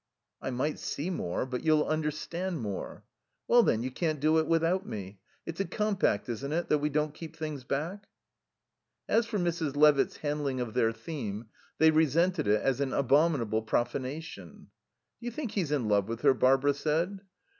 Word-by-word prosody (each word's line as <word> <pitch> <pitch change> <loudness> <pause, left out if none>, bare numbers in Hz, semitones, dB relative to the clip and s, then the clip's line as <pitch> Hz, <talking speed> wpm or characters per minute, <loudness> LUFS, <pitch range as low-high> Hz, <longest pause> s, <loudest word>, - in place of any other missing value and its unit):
"I - - -3
might 135 +4 -2
see 160 +7 -3
more, 90 - -2
but 125 -1 -4
you'll 155 -1 +4
understand 155 +3 -2
more." 105 -5 -5 0.4
"Well, 240 0 +6
then, 115 - +1
you 130 - -3
can't 155 +1 -1
do 155 +3 +3
without 165 +4 +1
me. 100 - -7 0.3
It's 165 +1 -6
a 195 - +1
compact, 200 - 0
isn't 130 +4 -4
it, 170 +2 -1
that 150 - +3
we 150 +1 0
don't 150 0 0
keep 160 0 -9
things 155 -4 -5
back?" 165 +10 -3 1.0
As 230 0 +2
for 225 -2 -2
Mrs. 170 -5 -1
Levitt's 150 -1 +4
handling 145 -3 -2
of 120 -3 -3
their 115 - +2
theme 115 -3 -6 0.3
they 160 0 +6
resented 160 +2 +2
it 105 +1 +3
as 135 0 +1
an 135 -1 -1
abominable 140 -5 +2
profanation. 120 - -4 0.5
"Do 235 - -11
you - - -2
think 245 -2 -4
he's 175 -8 -1
in 135 -7 0
love 100 -2 +2
with 115 0 -4
her?" 140 -2 +5
Barbara 135 +3 +3
said. 160 +7 -1
150 Hz, 175 wpm, -29 LUFS, 125-165 Hz, 1.0 s, Well